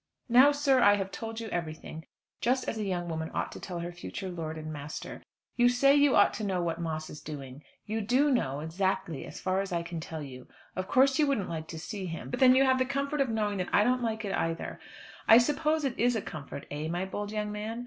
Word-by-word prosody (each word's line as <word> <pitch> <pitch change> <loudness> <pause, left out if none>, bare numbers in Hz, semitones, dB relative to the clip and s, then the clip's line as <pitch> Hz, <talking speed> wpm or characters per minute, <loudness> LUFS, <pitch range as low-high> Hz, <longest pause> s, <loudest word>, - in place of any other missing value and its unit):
Now, 255 +5 +7
sir, 280 -3 +3
I 205 0 +7
have 195 -1 -3
told 225 +2 -5
you 225 - -5
everything, 160 -2 -5 0.3
just 255 +2 +1
as 220 - -2
a - - -1
young 180 -3 -2
woman 160 -1 -3
ought - - -1
to - - -8
tell 180 -3 -6
her 175 +1 -4
future 180 +2 -6
lord 160 -2 -5
and 155 0 -6
master. 145 0 -7 0.4
You 245 0 +6
say 275 +3 +4
you 285 -1 +5
ought 205 - +5
to 215 - -5
know 190 -3 0
what 170 -1 -2
Moss 155 -1 -3
is 150 - -9
doing. 140 -2 -8 0.2
You 220 +1 -2
do 255 +7 +3
know, 140 - 0
exactly, 165 -2 -2
as - - -9
far 190 +1 0
as 195 -1 -5
I 170 -1 -1
can 170 -1 -5
tell 160 -1 -6
you. 130 -3 -10 0.3
Of 185 0 -3
course 270 +3 +4
you 300 - +4
wouldn't 255 -9 0
like 160 -1 -4
to 165 - -7
see 190 +2 -5
him, 160 -6 -6
but - - -3
then 255 -1 +7
you 265 - +6
have 260 0 +3
the 255 - +3
comfort 280 +2 -1
of 270 - +1
knowing 210 -3 -1
that 180 - -2
I 205 - +5
don't 250 +2 +2
like 220 -2 -2
it 195 - -2
either. 165 0 -2 0.5
I 225 - +9
suppose 300 +4 +2
it 260 -3 -2
is 245 +1 +3
a 220 - 0
comfort, 150 -3 -7
eh, 150 +2 -3
my 175 +3 -2
bold 205 +2 -5
young 210 -1 -2
man? 215 +3 -4
200 Hz, 250 wpm, -29 LUFS, 165-245 Hz, 0.5 s, I